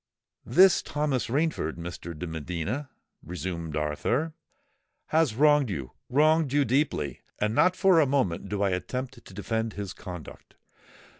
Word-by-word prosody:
"This 185 +9 +6
Thomas 145 -4 -1
Rainford, 140 - 0
Mr. 85 -1 -7
de 90 - -4
Medina," 90 - -4 0.3
resumed 85 -2 -5
Arthur, 115 - -1 0.8
"has 155 -8 +2
wronged 145 -1 +4
you—wronged 135 - +1
you 145 0 +3
deeply; 130 - 0 0.2
and 105 +1 0
not 180 +9 +4
for 190 -3 +5
a 150 - +4
moment 100 -10 0
do 100 -1 -1
I 100 - +2
attempt 125 +7 -4
to - - -14
defend 110 +2 -2
his 100 -3 -5
conduct." 90 -6 -10
115 Hz, 135 wpm, -27 LUFS, 90-145 Hz, 0.8 s, This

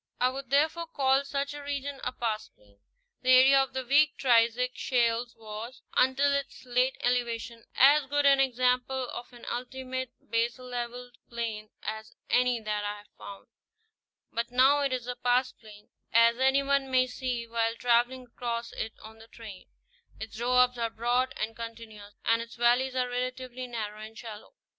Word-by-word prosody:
I 250 - +3
would 265 -1 -7
therefore 315 +4 +2
call 270 -2 +2
such 280 0 -3
a 290 - -7
region 285 -1 -4
a 250 - -1
pastplain. 215 - -5 0.4
The 255 0 +4
area 270 +2 +7
of 270 - -3
the 260 -1 -3
weak 295 +4 +4
Triassic 240 0 +3
shales 235 -2 0
was, 220 +3 -8
until 270 +2 +3
its 280 -1 -4
late 250 +1 +1
elevation, 235 -1 -1
as 285 +1 +6
good 290 +1 +1
an 275 -1 +6
example 255 0 +1
of 245 - -8
an 240 -1 -13
ultimate 260 +1 -4
baselevelled 245 +1 -3
plain 225 -3 -4
as 220 +1 -6 0.2
any 250 -1 +3
that 210 -1 -3
I 205 0 -3
have 205 0 -16
found; 200 -1 -11 0.9
but 235 +1 -2
now 260 +4 +5
it 280 -2 0
is 250 -2 -2
a 250 0 -4
pastplain, 245 -4 -2 0.2
as 230 +1 +5
any 265 +1 +3
one 275 -1 +1
may 255 -1 +4
see 250 -2 -4
while 230 0 -1
traveling 245 +2 +2
across 235 -1 -4
it 220 0 -4
on 220 +1 -12
the 225 - -14
train: 220 -5 -11 0.5
its 220 0 -7
doabs 250 +1 +2
are 230 -1 0
broad 245 +3 0
and 225 +1 -3
continuous, 225 -3 -9
and 230 0 +3
its 230 0 -9
valleys 245 +2 +2
are 250 -1 +1
relatively 255 0 -4
narrow 215 -3 -5
and 220 +1 -10
shallow. 220 - -10
245 Hz, 165 wpm, -28 LUFS, 230-260 Hz, 0.9 s, area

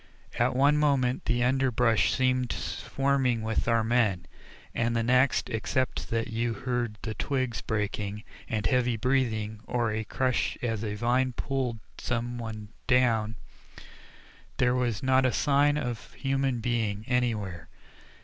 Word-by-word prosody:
At - - +2
one 140 +3 +4
moment 135 -4 +1
the 120 +1 +1
underbrush 125 -3 +2
seemed 130 -1 +1
swarming 135 -4 0
with 110 0 -1
our 115 -1 +3
men, 110 -6 +1 0.5
and 115 0 0
the 115 - +1
next, 125 +3 +3
except 130 +3 -2
that 115 +1 -1
you 115 +1 -1
heard 120 -2 -2
the 110 - -3
twigs 130 0 -2
breaking, 105 -1 -3 0.3
and 105 -2 -1
heavy 125 -2 +2
breathing 110 -4 0
or 120 -3 0
a 110 +1 -2
crash 130 +4 0
as 115 -2 -1
a 105 -1 -3
vine 125 +3 +1
pulled 130 -2 -2 0.2
some 120 0 -2
one 110 -2 -6 0.2
down, 115 -3 +3 1.2
there 125 0 +3
was 125 -3 -1
not 130 0 +4
a 130 - +3
sign 145 +2 +3
of 120 -7 -4
a - - -20
human 135 -3 0
being 110 -3 -1
anywhere. 105 - -1
120 Hz, 140 wpm, -28 LUFS, 110-130 Hz, 1.2 s, one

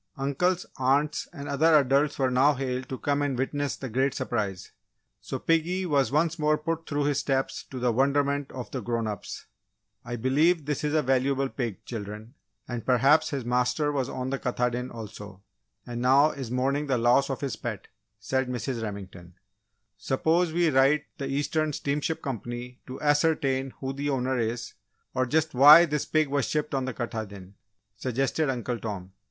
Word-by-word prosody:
Uncles, 145 +7 0
aunts, 140 +3 +1
and 145 -5 -8
other 155 +3 +4
adults 140 +1 +2
were 130 -2 +1
now 135 +4 +4
hailed 130 -1 -3
to 130 - -4
come 145 +1 0
and 140 -3 -1
witness 145 +2 -1
the 135 - -6
great 130 +3 0
surprise. 100 -6 -3 0.5
So - - -4
piggy 170 +3 +1
was 140 -6 +2
once 160 +3 +1
more 150 0 +3
put 165 +2 -3
through 145 0 0
his 145 -1 +1
"steps" 135 -2 -1
to 130 - -9
the 125 -1 +1
wonderment 140 +2 +1
of 125 -4 -7
the 130 - -3
grown 115 +1 -2
ups. 105 -3 -6 0.6
"I 120 0 -5
believe 145 +7 +2
this 150 0 -2
is 150 +1 0
a 155 - +3
valuable 135 +1 +1
pig, 120 -9 -4
children, 110 +1 -7 0.3
and 120 -3 -4
perhaps 135 +5 +4
his 140 -6 -4
master 125 +4 +1
was 135 -3 -1
on 130 +1 -4
the 135 - -2
Katahdin 125 0 -1
also, 105 -3 -9 0.4
and 120 0 -5
now 135 +4 +5
is 130 -4 -6
mourning 135 +4 0
the 135 -2 +1
loss 120 +4 +3
of 135 - -3
his 140 -2 -2
pet," 110 -5 -6 0.3
said 130 +5 -1
Mrs. 125 -1 -3
Remington. 95 -5 -7 0.6
"Suppose 160 +5 +1
we 170 -1 +2
write 135 +3 +4 0.2
the 135 - -3
Eastern 150 +2 0
Steamship 145 +4 -2
Company 120 0 -6
to 130 - -7
ascertain 145 -3 +2
who 135 0 -3
the 140 +1 -3
owner 130 -1 0
is, 115 +1 -3 0.4
or 130 0 0
just 155 +4 +1
why 150 +6 +9
this 150 -3 -2
pig 155 -1 +2
was 140 0 0
shipped 150 -1 -1
on 135 -1 0
the 130 - -3
Katahdin," 100 -5 -6 0.4
suggested 135 +6 -1
Uncle 125 -2 -2
Tom. 95 -4 -6
135 Hz, 175 wpm, -27 LUFS, 120-145 Hz, 0.6 s, why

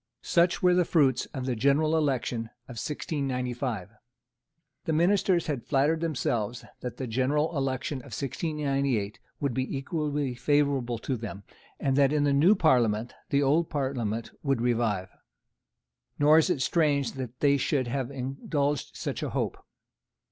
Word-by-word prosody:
Such 175 +2 +2
were 180 0 +6
the 180 0 +4
fruits 140 -7 +2
of 130 -2 -6
the 130 -2 -1
general 140 +6 +3
election 130 -6 0 0.2
of 120 -2 -7
1695. 125 - -3 0.9
The 160 - 0
ministers 180 +1 +3
had 140 -6 -3
flattered 150 +3 +2
themselves 120 -7 -1
that 125 -1 -6
the 130 - -3
general 140 +7 0
election 135 +1 -1
of 125 - -13
1698 140 -7 -1 0.2
would 140 -3 -1
be 130 +2 -2
equally 145 -2 -2
favourable 135 -2 +1
to 130 - -3
them, 105 -4 -7 0.4
and 135 -1 +1
that 140 -1 +5
in 150 -1 +2
the 145 -1 +3
new 165 +10 +5
Parliament 120 - +2 0.2
the 140 0 +2
old 155 +5 +2
Parliament 120 -6 -2
would 135 -4 0
revive. 115 -6 0 1.1
Nor 150 +2 +6
is 160 - +2
it 150 -8 +1
strange 145 -3 +2
that 125 -2 -7
they 140 -1 +4
should 135 0 0
have 125 +1 -2
indulged 140 +2 -2
such - - -4
a - - -2
hope. - - -3
135 Hz, 150 wpm, -28 LUFS, 125-150 Hz, 1.1 s, were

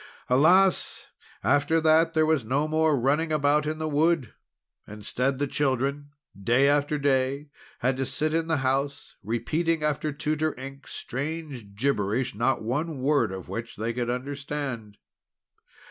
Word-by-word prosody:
Alas! 175 +9 +3 0.3
after 145 +3 +3
that 160 +1 +3
there 155 0 +4
was 155 -5 +2
no 135 +7 0
more 155 -1 +2
running 150 +6 +1
about 150 0 +2
in 155 0 -2
the 155 0 -3
wood! 155 -4 +1 0.5
Instead 125 +6 -2
the 145 - 0
children, 140 +1 -1 0.3
day 125 +7 +4
after 145 +1 +2
day, 140 +1 0 0.3
had 130 +1 +1
to 135 - -1
sit 155 +1 -1
in 165 0 0
the 160 -1 +1
house, 140 +2 -1
repeating 155 - -1
after 150 0 0
Tutor 155 0 -2
Ink 135 +1 -9
strange 140 -7 -5
gibberish, 115 0 0
not 120 +3 0
one 145 +7 -2
word 140 -4 +1
of 95 -1 -7
which 115 0 -6
they 115 +3 -3
could 120 0 -2
understand. 135 -4 -4
140 Hz, 145 wpm, -26 LUFS, 125-155 Hz, 0.5 s, there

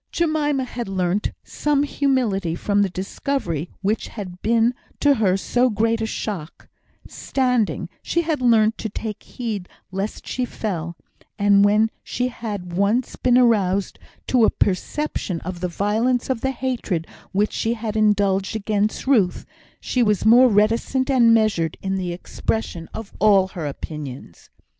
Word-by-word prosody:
Jemima 300 -4 +1
had 240 -2 -5
learnt 190 +1 0
some 290 -1 0
humility 245 - 0
from 205 +3 +1
the 200 - +2
discovery 185 - -3
which 210 +3 0
had 185 -4 -8
been 230 +2 +3 0.3
to 290 -1 +5
her 200 -7 +2
so 245 +5 +1
great 225 +1 +1
a 220 - 0
shock; 185 -8 -5 0.4
standing, 240 - 0
she 340 - 0
had 315 -4 -1
learnt 225 -2 +3
to 220 - -3
take 210 0 -5
heed 215 -7 -5 0.2
lest 195 +3 -4
she 255 - -2
fell; 170 -8 -4 0.4
and 200 -1 +5
when 210 +2 +4
she 250 0 -2
had 205 -7 -6
once 205 +7 +1
been 250 -1 +3
aroused 200 -6 +2 0.3
to 250 -3 +3
a - - +6
perception 195 - -1
of 180 0 -6
the 180 - -1
violence 225 +8 0
of 240 -3 -2
the 265 - 0
hatred 250 -11 -2 0.3
which 205 +2 +1
she 230 +1 0
had 220 -2 -4
indulged 200 -2 +2
against 210 0 -1
Ruth, 220 -10 +2 0.3
she 250 - -1
was 210 -4 +2
more 245 +4 +7
reticent 230 +6 +2
and 240 -3 +5
measured 215 -8 +2
in 190 0 -3
the 185 -2 -2
expression 175 -1 -3
of 220 -2 -8
all 195 -2 +5
her 165 -5 -5
opinions. 140 - -8
215 Hz, 150 wpm, -22 LUFS, 190-245 Hz, 0.4 s, more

